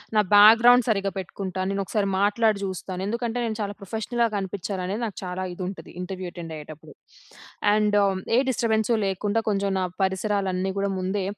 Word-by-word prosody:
నా 215 - +6
బ్యాక్గ్రౌండ్ 230 +4 +8
సరిగ్గా 195 -2 +1
పెట్టుకుంటాను. 185 0 -4
నేను 195 0 -1
ఒకసారి 200 0 -1
మాట్లాడి 210 +1 +2
చూస్తాను, 185 0 -5
ఎందుకంటే 235 +2 -2
నేను 220 -2 -3
చాలా 205 0 -3
ప్రొఫెషనల్‌గా 225 +4 -1
కనిపించాలనేది 195 +1 -3
నాకు 210 - -6
చాలా 185 +1 -4
ఇది 185 - -6
ఉంటది. 195 - -8
ఇంటర్వ్యూ 185 0 -5
అటెండ్ 165 -2 -7
అయ్యేటప్పుడు. 155 0 -11 0.8
అండ్ 210 -1 +2 0.4
ఏ - - +6
డిస్టర్బెన్స్ 220 -2 +1
లేకుండా 200 +3 0
కొంచెం 200 -1 0
నా - - +1 0.2
పరిసరాలన్నీ 190 -1 0
కూడా, 200 0 0
ముందే 190 +2 -1
200 Hz, 155 wpm, -25 LUFS, 185-215 Hz, 0.8 s, బ్యాక్గ్రౌండ్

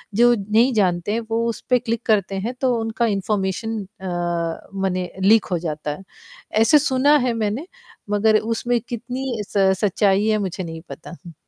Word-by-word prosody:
जो 240 +1 +6
नहीं 220 +5 +2
जानते 180 -3 +1
हैं 230 - 0
वो 230 +1 0
उस 225 - -5
पे 250 -1 +4
क्लिक 230 0 -2
करते 200 -3 +1
हैं, 220 +6 -3
तो 255 -2 +2
उनका 225 +1 -1
इन्फॉर्मेशन 205 +1 -1 0.2
अ, 175 -2 -3
मने 185 -2 -2
लीक 215 +3 +5
हो 175 - +2
जाता 150 -3 -4
है। 190 +6 -8 0.6
ऐसे 295 +7 +6
सुना 280 +1 +3
है 245 - +1
मैंने 225 - -2 0.4
मगर 215 +1 +3
उसमें 230 +2 -1
कितनी 245 0 -4
स 195 -1 +3
सच्चाई 200 0 +2
है, 215 -1 +3
मुझे 190 -2 -3
नहीं 165 -1 -7
पता 175 - -9
हूँ। 170 -2 -10
210 Hz, 175 wpm, -21 LUFS, 190-230 Hz, 0.6 s, जो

